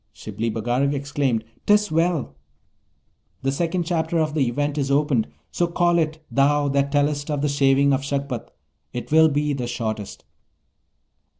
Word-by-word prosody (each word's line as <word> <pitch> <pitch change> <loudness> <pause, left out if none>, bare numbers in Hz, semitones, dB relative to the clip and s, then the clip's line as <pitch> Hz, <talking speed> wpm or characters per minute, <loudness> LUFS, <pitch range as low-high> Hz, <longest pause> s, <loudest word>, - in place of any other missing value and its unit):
Shibli 115 +1 -4
Bagarag 120 +6 0
exclaimed, 140 -4 -1 0.2
''Tis 210 -1 +4
well! 165 - 0 1.1
The 135 - +1
second 170 +5 -1
chapter 165 0 -1
of 155 -2 0
the 145 -5 +1
Event 145 +4 -1
is 135 -1 -1
opened; 140 -5 +2 0.2
so 175 - 0
call 175 0 +2
it, 155 -1 -2
thou 145 +1 +3
that 140 0 +1
tellest 145 0 0
of 145 -1 -1
the - - +2
Shaving 140 0 +3
of 135 - +1
Shagpat. 140 -3 -3 0.4
It 120 +2 -6
will 160 0 +6
be 145 0 0
the 125 -3 -3
shortest.' 110 -4 -4
145 Hz, 155 wpm, -23 LUFS, 135-155 Hz, 1.1 s, will